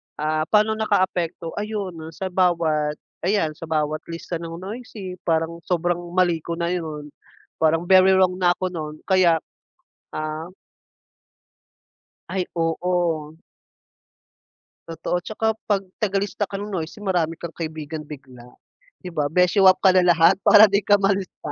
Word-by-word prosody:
ah, 155 +1 -1
paano 215 +2 +3
nakaapekto? 180 -5 -1
Ayun, 210 -2 -3
noon 160 +1 -9
sa 190 +1 -4
bawat 165 -5 +1 0.3
ayan 170 -6 0
sa - - -7
bawat 155 -1 -2
lista 170 +1 -5
ng 165 0 -7
noisy 200 -2 -7
parang 165 0 0
sobrang 175 -1 0 0.2
mali 180 -2 +3
ko 170 - -3
na 170 0 -2
yun, 155 -4 -4 0.5
parang 160 +1 +2
very 190 0 +7
wrong 185 -1 +3
na 175 -1 +3
ako 185 +1 -3
nun 155 -3 -7
kaya, 175 -4 +4 0.7
ah 155 +1 -4 1.8
Ay 185 -1 -1
oo. 165 -2 -1 1.5
Totoo, 165 +2 -2
at 175 - -7
saka 220 +1 -2 0.2
'pag 205 -2 +1 0.2
tagalista 200 0 -1
ka 195 0 -6
ng 205 - -6
noisy 180 +1 -5
marami 175 -5 0
kang 170 - -4
kaibigan 155 -1 -6
bigla, 130 -5 -12 0.6
'di 180 - -7
ba, 155 -4 -1
beshy 180 +3 +3
up 185 -1 +6
ka 190 - +6
na 185 -1 +4
lahat 175 +1 +5
para 210 0 +8
'di 200 +1 +1
ka 205 -1 +4
malista. 195 -6 -1
175 Hz, 145 wpm, -22 LUFS, 160-190 Hz, 1.8 s, para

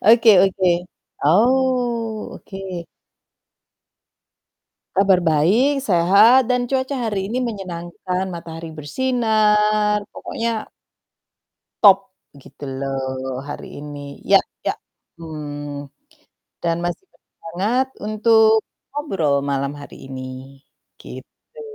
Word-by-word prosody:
Oke 230 0 +7
oke. 190 -1 0 0.6
Oh, 235 - +1
oke. 195 - -11 2.4
Kabar 195 -1 +4
baik, 185 - +3 0.2
sehat, 205 +8 +6
dan 250 0 +3
cuaca 265 +1 0
hari 200 -3 -2
ini 235 +5 -2
menyenangkan, 185 -3 -4
matahari 165 -1 -8
bersinar, 215 - +2
pokoknya 230 -1 -4 1.2
top 195 -2 +9 0.4
gitu 140 +2 -12
loh, 130 -1 -3
hari 145 - -6
ini. 145 0 -8 0.3
Ya - - +8 0.3
ya, - - +1 0.5
mmm, 145 -2 -6 0.8
dan 170 -1 +1
masih 175 - -3
bersemangat, 205 +10 -3 0.2
untuk 220 0 +4 0.3
ngobrol 195 - -1 0.2
malam 140 0 -1
hari 140 - -11
ini, 130 +1 -8 0.4
gitu. 475 - -13
195 Hz, 90 wpm, -21 LUFS, 150-230 Hz, 2.4 s, top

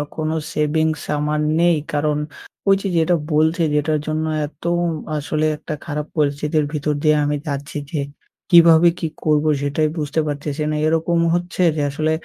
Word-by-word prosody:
কোনো 155 0 -2 0.2
savings 155 0 0 0.2
আমার 150 +1 -1 0.2
নেই। 175 0 +4 0.2
কারণ, 150 0 +1 0.5
ঐ - - +5
যে, 200 - -2
যেটা 165 +2 +3 0.2
বলছে 160 +3 +2
যেটার 150 +1 +1
জন্য 155 0 -1 0.2
এত 145 -1 -19 0.5
আসলে 155 +1 -1
একটা 155 - -6
খারাপ 150 -1 -3
পরিস্থিতির 150 +1 +1
ভিতর 150 0 -1
দিয়ে 155 0 +4
আমি 145 0 0
যাচ্ছি 145 +1 -4
যে, 155 - -2 0.5
কিভাবে 170 -1 +7
কি 165 - -1 0.2
করবো? 155 0 +2
সেটাই 145 +2 0
বুঝতে 150 0 -1
পারতেছি 145 +1 -3
না। - - -1
এরকম 165 +1 +1
হচ্ছে 175 +1 -2
যে 150 - -1
আসলে, 155 +2 -1
155 Hz, 155 wpm, -20 LUFS, 150-160 Hz, 0.5 s, কিভাবে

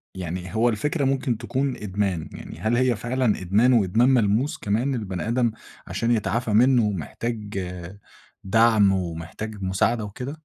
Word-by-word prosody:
يعني 90 +1 -5
هو 120 +2 +3
الفكرة 140 +6 -1
ممكن 130 -3 0
تكون 135 +2 -2
إدمان، 95 -5 -2
يعني 80 - -9
هل 110 +5 +1
هي 130 -2 +2
فعلًا 120 -2 0
إدمان 110 +8 +3
وإدمان 115 +4 +3
ملموس 120 +2 +2
كمان، 120 +7 -1
البني 95 -3 -4
آدم 120 -1 +1 0.4
عشان 115 +1 -1
يتعافى 115 0 0
منّه 120 0 +4
محتاج 105 +4 -4 0.8
دعم، 110 0 +4
ومحتاج 95 +4 -4
مساعدة 105 +4 +1
وكده؟ 125 +7 -6
110 Hz, 140 wpm, -24 LUFS, 95-120 Hz, 0.8 s, منّه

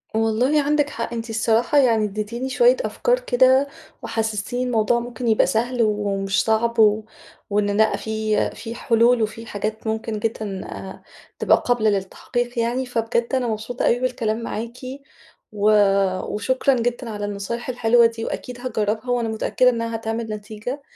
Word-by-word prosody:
والله 225 +7 +2
عندِك 290 0 +1
حق. 230 -3 -5
أنتِ 230 0 -5
الصراحة 225 +5 +1
يعني 230 -6 +4
ادّيتيني 215 +5 -4
شوية - - +4
أفكار - - +1
كده، 260 - +4 0.3
وحسّستيني 220 +2 -2
الموضوع 240 -1 +2
ممكن 240 0 -5
يبقى 220 -1 +4
سهل 240 +2 0
و 215 - +3 0.2
ومش 195 -1 0
صعب 230 +1 +1
و 215 0 +5 0.5
وإن 205 0 +1
لأ 220 0 +3
في 220 -1 -1
في 230 0 -7
حلول 235 +1 +3
وفي 215 +1 -2
الحاجات 220 0 -4
ممكن 220 -1 -2
جدًا 210 -3 -3
آآ، 190 0 -9 0.4
تبقى - - +4
قابلة 240 -3 +2
للتحقيق 235 +5 -2
يعني. 245 +3 0
فبجد 235 +1 -1
أنا 250 -2 0
مبسوطة 225 +3 -3
أوي 240 - +3
بالكلام 235 -3 -1
معاكِ 230 +2 -5 0.7
و 210 0 +2 0.6
وشكرا 260 +5 +1
جدًا 240 0 -2
على 205 -1 -4
النصايح 205 +5 -4
الحلوة 235 -1 +4
دي 230 0 -1
وأكيد 250 -1 -5
هاجرّبها، 220 -1 -2
وأنا 235 -2 0
متأكدة 235 +3 +2
إنّها 230 -1 -2
هتعمل 225 +1 -3
نتيجة. 215 +6 -6
230 Hz, 150 wpm, -22 LUFS, 215-245 Hz, 0.7 s, و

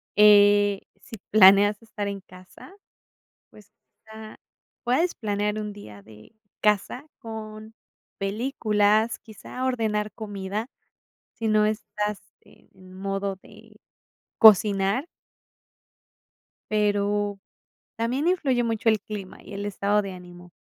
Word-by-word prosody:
eh, 205 -1 +5 0.2
si 225 - -11
planeas 205 +1 +6
estar 220 -2 -6
en 200 -1 -5
casa, 185 - -16 0.8
pues, 210 -2 -18
o 220 - -25
sea, 220 0 -11 0.4
puedes 265 +9 +1
planear 210 -1 -2
un 210 -1 -5
día 105 - -12
de 105 - -17 0.3
casa 210 +6 0
con 220 -1 -9 0.4
películas, 215 0 +1
quizá, 225 +3 -9
ordenar 220 -5 -1
comida 205 0 -5 0.7
si 225 - -3
no 215 0 +3
estás 210 -1 -3 0.2
en 185 -1 -20
modo 195 0 -3
de 215 0 -18 0.6
cocinar 210 - +5 1.6
pero 205 -1 0 0.6
también 250 +8 -1
influye 270 -9 +1
mucho 225 -1 0
el 215 -2 +2
clima, 200 -3 -8
y - - -11
el 200 +1 -5
estado 205 +1 0
de 195 -1 -6
ánimo. 175 -1 -13
210 Hz, 110 wpm, -25 LUFS, 200-220 Hz, 1.6 s, planeas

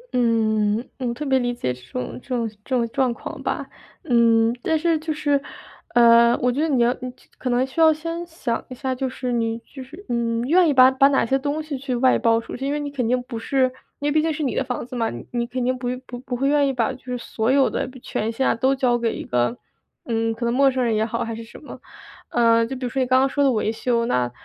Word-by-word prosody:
嗯， 220 -3 +2 0.2
嗯， 255 - -2
我 - - -2
特 300 - -5
别 265 -1 +3
理 245 -1 -1
解 125 - -2
这 125 - -14
种 125 -1 -5
这 - - -23
种 235 -2 -1 0.2
这 - - -23
种 235 -2 +1
状 260 0 +1
况 - - -7
吧。 - - -3 0.4
嗯， 230 -4 +3
但 320 - +1
是 330 +1 +1
就 315 0 -4
是， 290 -2 +1 0.5
呃， 235 0 +6
我 250 - +2
觉 275 +5 -1
得 320 - +1
你 255 -5 +3
要 240 +1 +3
就 255 -1 -7 0.3
可 255 - -3
能 245 +1 +2
需 265 +5 -3
要 320 - +7
先 330 +2 -4
想 270 -8 -3
一 255 - -7
下， 260 0 -2
就 260 +1 -2
是 250 -1 -4
你 230 -1 0
就 270 -2 -10
是， 325 +10 -13
嗯， 235 -1 0
愿 335 +5 +4
意 290 - +2
把 255 0 +7
把 270 +1 +5
哪 280 -1 +2
些 265 +4 +1
东 290 +3 -2
西 305 -2 -5
去 260 -2 -3
外 255 +1 +3
包 230 -1 +3
出 230 - -8
去。 265 - -7
因 - - -1
为 295 - -1
你 290 -1 -4
肯 255 -5 -2
定 250 +1 +1
不 235 -2 -6
是 265 +4 +1 0.4
因 290 - -2
为 295 - +1
毕 310 - +3
竟 320 +1 0
是 305 0 -3
你 260 - -1
的 - - 0
房 250 -2 -4
子 255 - -9
嘛， 230 -2 0
你 120 - -8
你 235 -1 -1
肯 250 0 -3
定 255 +1 +1
不 245 - -4 0.2
不 245 - -8
不 250 0 -5
会 270 +3 0
愿 285 0 +3
意 - - +1
把 245 +2 0
就 250 - -14
是 250 -1 -3
所 225 -1 -2
有 270 -1 +4
的 - - -2
权 220 +2 -2
限 265 +4 0
啊 - - +3
都 260 +4 +1
交 255 -2 +2
给 230 -1 -1
一 - - -5
个 125 - 0 0.5
嗯， 225 -1 0
可 235 +1 -4
能 235 - +1
陌 275 +2 +5
生 260 -1 -1
人 230 -2 +1
也 215 - +1
好， 230 +1 -2
还 230 - -4
是 230 - -7
什 225 - -13
么。 - - -10 0.5
呃， 230 -1 +4
就 265 - -5
比 255 0 -5
如 - - -2
说 270 - -2
你 255 - +1
刚 255 +1 +4
刚 265 - +3
说 285 +1 0
的 275 - +4
维 215 -2 0
修， 235 +1 0
那， 125 - 0
250 Hz, 295 characters per minute, -22 LUFS, 230-275 Hz, 0.5 s, 要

